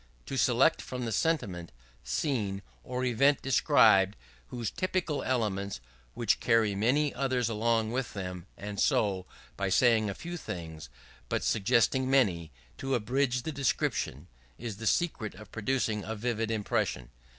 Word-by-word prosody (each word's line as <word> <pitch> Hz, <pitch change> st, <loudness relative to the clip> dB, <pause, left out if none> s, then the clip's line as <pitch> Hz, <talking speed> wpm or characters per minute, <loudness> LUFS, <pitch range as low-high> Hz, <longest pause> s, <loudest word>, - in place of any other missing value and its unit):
To -, -, -5 dB
select -, -, +3 dB
from 125 Hz, -1 st, -5 dB
the 115 Hz, -, -2 dB
sentiment, 100 Hz, -, -1 dB, 0.3 s
scene, 100 Hz, -, -1 dB, 0.2 s
or 125 Hz, -, -3 dB
event 135 Hz, +4 st, +3 dB
described 110 Hz, -8 st, +5 dB, 0.4 s
those 120 Hz, -4 st, -3 dB
typical 185 Hz, -5 st, -1 dB
elements 100 Hz, -, -1 dB, 0.4 s
which 120 Hz, -1 st, +1 dB
carry 115 Hz, -3 st, +3 dB
many 130 Hz, +9 st, +2 dB
others 125 Hz, -3 st, 0 dB
along 115 Hz, 0 st, +1 dB
with 125 Hz, -3 st, -3 dB
them; 90 Hz, -2 st, -5 dB
and 100 Hz, 0 st, -6 dB
so, 95 Hz, -3 st, +1 dB, 0.3 s
by 100 Hz, -1 st, -1 dB
saying 110 Hz, 0 st, +4 dB
a 100 Hz, -, -4 dB
few 175 Hz, +1 st, -6 dB
things 80 Hz, -, -7 dB, 0.4 s
but -, -, -1 dB
suggesting 115 Hz, +5 st, +2 dB
many, 90 Hz, -, +2 dB, 0.3 s
to 135 Hz, 0 st, 0 dB
abridge 125 Hz, +2 st, 0 dB
the 160 Hz, -, -3 dB
description; 110 Hz, -, -1 dB, 0.3 s
is 110 Hz, -4 st, -6 dB
the 115 Hz, +1 st, -4 dB
secret 115 Hz, -, 0 dB
of 105 Hz, +2 st, -13 dB
producing 110 Hz, -2 st, -1 dB
a 110 Hz, +3 st, -4 dB
vivid 115 Hz, 0 st, -2 dB
impression. 100 Hz, -, -1 dB
115 Hz, 140 wpm, -30 LUFS, 100-130 Hz, 0.4 s, described